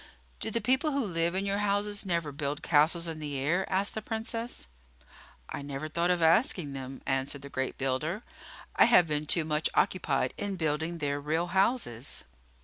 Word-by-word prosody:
"Do - - -2
the 230 +1 -1
people 265 +7 +2
who 280 -1 +1
live 170 -2 0
in 195 +1 0
your 200 0 0
houses 205 0 0
never 170 -4 0
build 145 0 -3
castles 165 +2 +3
in 160 -1 -5
the 145 -2 -3
air?" 170 +9 0
asked 195 +2 +1
the 220 - -3
Princess. 225 +2 -4 0.8
"I - - -5
never 140 +1 -5
thought 170 +3 0
of 175 -2 +2
asking 165 - +3
them," 135 0 -7
answered 135 +1 -2
the 140 - -8
great 130 -1 -3
builder. 150 - -1 0.5
"I - - +7
have 205 -7 +7
been 150 -1 -1
too 165 0 +3
much 155 0 +1
occupied 135 -8 +1
in 200 -1 -2
building 160 0 -1
their 145 -2 -2
real 160 +4 0
houses." 190 - 0
165 Hz, 180 wpm, -29 LUFS, 145-200 Hz, 0.8 s, I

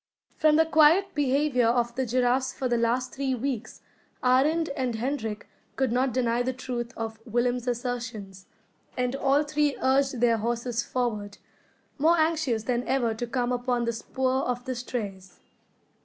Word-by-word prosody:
From 310 -1 +4
the 320 +1 +5
quiet 320 +5 +4
behaviour 275 -3 +2
of 240 0 +1
the 260 +1 -2
giraffes 255 +2 +1
for 260 - -2
the 240 - +1
last 235 +2 0
three 270 -1 -1
weeks, 245 -1 -4 0.4
Arend 290 +6 +3
and 260 -4 -2
Hendrik 225 -3 -3 0.3
could 265 -3 0
not 255 +2 +1
deny 240 -1 +1
the 260 +1 -1
truth 245 -2 -5
of 225 -1 -5
Willem's 245 +1 -1
assertions; 230 -6 -4 0.5
and 250 +1 0
all 275 +2 +2
three 295 -1 0
urged 265 -1 +2
their 235 -1 +3
horses 235 +1 -1
forward, 215 -5 -3 0.6
more 330 +4 +4
anxious 315 -8 +1
than 240 +1 0
ever 245 -3 +1
to 240 +2 -4
come 245 0 -1
upon 245 -1 0
the 235 - -1
spoor 260 +3 -1
of 245 0 -3
the 260 - -2
strays. 205 -7 -6
250 Hz, 155 wpm, -27 LUFS, 235-270 Hz, 0.6 s, the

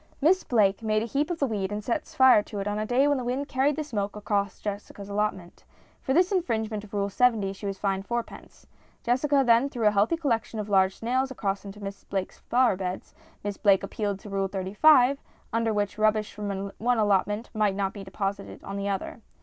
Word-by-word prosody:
Miss 350 +6 +3
Blake 210 -4 +2
made 215 -1 +1
a - - -2
heap 280 +6 -1
of 350 - -2
the 285 - +1
weed 205 -5 -2
and 210 0 -4
set 230 +3 -2
fire 260 -5 +6
to 205 0 -7
it 195 - -3
on 205 0 -1
a 215 - -2
day 260 +4 +3
when 285 -2 +2
the - - -4
wind 255 +4 -2
carried 270 +2 +1
the 310 - -2
smoke 205 -8 -3
across 200 -1 -2
Jessica's 205 -1 -6
allotment. 200 -4 -3 0.4
For - - -3
this 355 +7 +3
infringement 220 - -1
of 210 -1 -10
Rule 200 0 0
70 210 -2 +2
she 200 +1 -7
was 195 -1 -3
fined 195 0 -2
fourpence. 235 -1 -6 0.4
Jessica 275 +3 +2
then 240 +3 +4
threw 235 -5 -3
a 210 - +6
healthy 210 +10 +2
collection 235 -7 -1
of 210 0 -4
large 190 -1 +3
snails 255 +3 0
across 200 -6 -3
into 200 +1 -9
Miss 195 0 -7
Blake's 190 -2 -4
flower 245 -4 +2
beds. 185 0 -5 0.3
Miss 205 -1 -3
Blake 200 -2 +4
appealed 200 0 -2
to 210 - -10
Rule 195 0 0
35, 245 +9 +4 0.3
under 230 0 +1
which 205 0 -2
rubbish 215 0 +2
from 200 -1 -4
one 245 +2 +2
allot 205 -3 +3
ment 210 +3 -5
might 210 -3 +1
not 195 -1 -1
be 200 - -8
deposited 195 +1 -5
on 195 0 -6
the 200 0 -2
other. 200 +4 -4
210 Hz, 215 wpm, -27 LUFS, 200-245 Hz, 0.4 s, fire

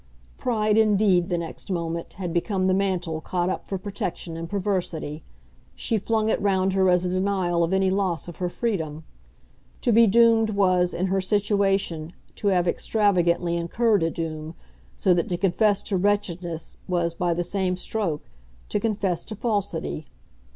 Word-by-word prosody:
Pride 215 -4 +2
indeed, 200 -4 +3
the 175 - 0
next 170 +3 -6
moment, 170 -2 -3
had 180 -3 -5
become 185 +2 0
the 185 - +3
mantle 180 -5 -1
caught 180 +2 -1
up - - -5
for 195 - -2
protection 185 -3 -5
and 165 0 -6
perversity; 180 -6 -2 0.5
she 225 -3 -1
flung 220 +1 0
it - - +1
round 190 -1 +2
her 190 -1 +3
as 180 0 +3
a - - 0
denial 185 -2 +1
of 165 - 0
any 190 0 +2
loss 190 -4 -1
of 170 - -9
her 180 -1 -1
freedom. 160 -8 -3 0.8
To 240 - +2
be 230 +1 +6
doomed 225 +1 +5
was, 185 -3 +2
in 180 - 0
her 190 0 +1
situation, 195 -4 0 0.2
to 210 - -2
have 180 -3 +3
extravagantly 175 -4 +1
incurred 205 +5 +1
a 165 - +2
doom, 160 -1 -5 0.4
so 185 - +3
that 170 -2 0
to 175 - -1
confess 200 +2 +2
to 195 - -1
wretchedness 180 -4 -2
was, 175 -2 0
by 175 0 0
the 175 - 0
same 185 0 -1
stroke, 180 -5 -3 0.4
to 210 - 0
confess 200 -5 -1
to 215 - -7
falsity. 195 - -2
185 Hz, 165 wpm, -25 LUFS, 170-205 Hz, 0.8 s, be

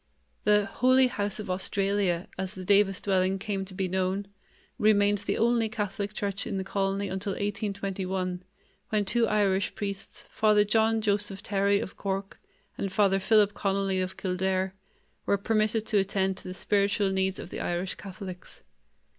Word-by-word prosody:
The 210 -1 +4
"Holy 255 +6 +4
House 205 -5 -1
of 205 -3 -4
Australia", 195 -1 0
as 190 +2 -4
the 185 - -7
Davis 195 0 +3
dwelling 190 -1 +1
came 195 0 -3
to 190 0 -11
be 190 -1 -1
known, 190 +2 -1 0.5
remained 205 -1 +4
the - - -2
only 230 -1 +2
Catholic 205 -2 -3
church 200 -2 -3
in 205 -4 -2
the 190 - -2
colony 195 +1 -1
until 190 +1 -3
1821, 195 -3 -3 0.5
when 210 -2 +1
two 230 +3 +2
Irish 200 -2 +1
priests, 200 -1 -5
Father 215 -1 +4
John 220 +1 +2
Joseph 205 -2 0
Therry 200 0 +2
of 190 - -6
Cork 195 0 -3 0.4
and 195 - -2
Father 195 -1 +3
Philip 205 0 +4
Connolly 195 -1 0
of 185 0 -4
Kildare, 190 0 -1 0.5
were 200 - +3
permitted 215 +1 +1
to 210 -3 +2
attend 190 -1 0
to - - -9
the 185 - -5
spiritual 200 0 +1
needs 190 0 0
of - - -8
the - - -5
Irish 175 +2 -2
Catholics. 190 -2 -9
200 Hz, 160 wpm, -28 LUFS, 190-205 Hz, 0.5 s, The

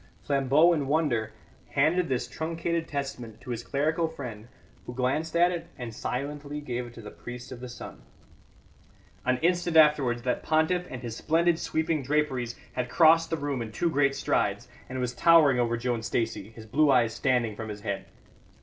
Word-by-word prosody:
Flambeau, 140 +5 +4
in 145 -4 -1
wonder, 135 -8 +1 0.4
handed 160 +5 +2
this 125 -2 -1
truncated 165 +3 -2
testament 130 -6 -5
to 125 - -8
his 120 -1 -3
clerical 155 +6 0
friend, 125 -9 -8 0.4
who 120 - -6
glanced 150 +6 -1
at 175 +1 +5
it 170 -1 -4
and 120 -3 -6
silently 145 +5 -4
gave 125 -4 -4
it 120 - -13
to 115 - -9
the 105 - -8
priest 120 +1 -9
of 125 - -7
the 125 0 -7
sun. 120 - -9 1.3
An 130 0 +3
instant 175 -1 +2
afterwards 140 -6 +4
that 125 -1 0
pontiff, 160 +3 +1
in 130 - -7
his 115 -3 -5
splendid 165 +4 +2
sweeping 160 -1 0
draperies, 135 -4 0 0.2
had 125 -1 -2
crossed 165 +2 +5
the 165 - -1
room 140 -3 -2
in 110 -1 -5
two 170 +9 0
great 140 -1 +2
strides, - - 0 0.2
and 130 0 -4
was 125 -1 -1
towering 145 -1 +5
over 120 -1 +1
Joan 120 -1 -1
Stacey, 115 -3 -2
his 115 0 -12
blue 145 +7 +3
eyes 120 -4 +4
standing 125 -5 +1
from 110 0 -6
his 105 -1 -7
head. 100 -2 -3
135 Hz, 180 wpm, -28 LUFS, 120-160 Hz, 1.3 s, at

